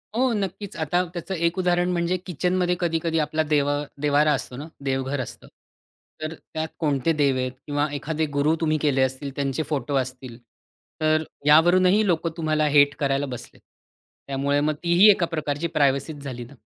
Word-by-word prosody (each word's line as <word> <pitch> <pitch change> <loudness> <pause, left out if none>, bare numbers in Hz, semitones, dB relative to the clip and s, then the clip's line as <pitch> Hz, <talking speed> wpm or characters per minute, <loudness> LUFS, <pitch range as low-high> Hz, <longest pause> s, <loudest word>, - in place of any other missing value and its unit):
हो 255 +2 +2
नक्कीच. 200 -1 -4
आता 165 +3 +1
त्याचं 175 +2 -5
एक 170 +2 0
उदाहरण 180 0 +2
म्हणजे 175 +1 0
किचनमध्ये 180 +1 0
कधी-कधी 165 -1 0
आपला 155 +1 0
देवा 145 0 +2 0.2
देव्हारा 150 +1 +3
असतो 130 -2 -4
ना, 145 +3 -7 0.2
देवघर 135 +1 -1
असतं. 125 - -9 0.7
तर 155 +1 -3
त्यात 160 0 -6
कोणते 145 -1 +1
देव 135 -2 +3
आहेत 130 0 -1 0.2
किंवा 145 0 0
एखादे 155 +2 -2
गुरु 150 +3 +3
तुम्ही 155 -1 +2
केले 140 -3 +2
असतील, 130 +2 -1
त्यांचे 140 +1 -1
फोटो 140 -2 -2
असतील, 130 -2 -4 0.6
तर 155 0 +2 0.2
यावरूनही 180 +7 +5
लोकं 170 -2 +1
तुम्हाला 155 -1 +1
हेट 145 0 +5
करायला 140 0 0
बसलेत. 125 -3 -9 0.7
त्यामुळे 140 +1 0
मग 155 +1 +1
तीही 175 +5 +6
एका 185 -3 +1
प्रकारची 155 -1 -2
प्रायव्हसीच 140 +1 +1
झाली 125 -3 -6
ना? 120 - -15
155 Hz, 160 wpm, -24 LUFS, 140-170 Hz, 0.7 s, तीही